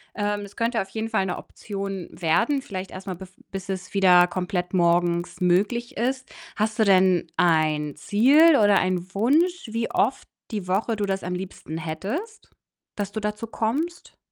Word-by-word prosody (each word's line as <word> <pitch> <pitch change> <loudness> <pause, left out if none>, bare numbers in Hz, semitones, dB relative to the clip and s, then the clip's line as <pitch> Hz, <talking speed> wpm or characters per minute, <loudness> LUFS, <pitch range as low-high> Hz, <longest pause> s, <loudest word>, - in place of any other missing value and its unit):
Ähm, 205 0 -1
es 200 0 -10
könnte 230 0 0
auf 195 - -7
jeden 220 0 -3
Fall 190 - +1
'ne 180 - -3
Option 195 -3 -6
werden, 230 - +1
vielleicht 190 -8 -6
erst 190 +1 -9
mal 185 - -3
bev 190 0 -11 0.2
bis 195 0 -6
es 185 -1 -5
wieder 180 -3 +6
komplett 180 0 -3
morgens 175 0 +1
möglich 210 +7 +1
ist. 260 +3 -2 0.2
Hast 215 +1 -1
du 220 - +5
denn 185 -3 +4
ein 155 -3 +2
Ziel 275 - +5
oder 205 -5 +5
ein 185 0 -2
Wunsch, 315 - +2
wie 230 0 -2
oft - - 0 0.3
die 205 -5 -4
Woche 210 +4 0
du 205 - -1
das 195 -1 -2
am 180 - -3
liebsten 180 -3 -6
hättest, 205 - -5 0.5
dass 205 -1 -3
du 220 - -3
dazu 210 +2 -3
kommst? 285 +11 -3
195 Hz, 170 wpm, -24 LUFS, 180-225 Hz, 0.5 s, wieder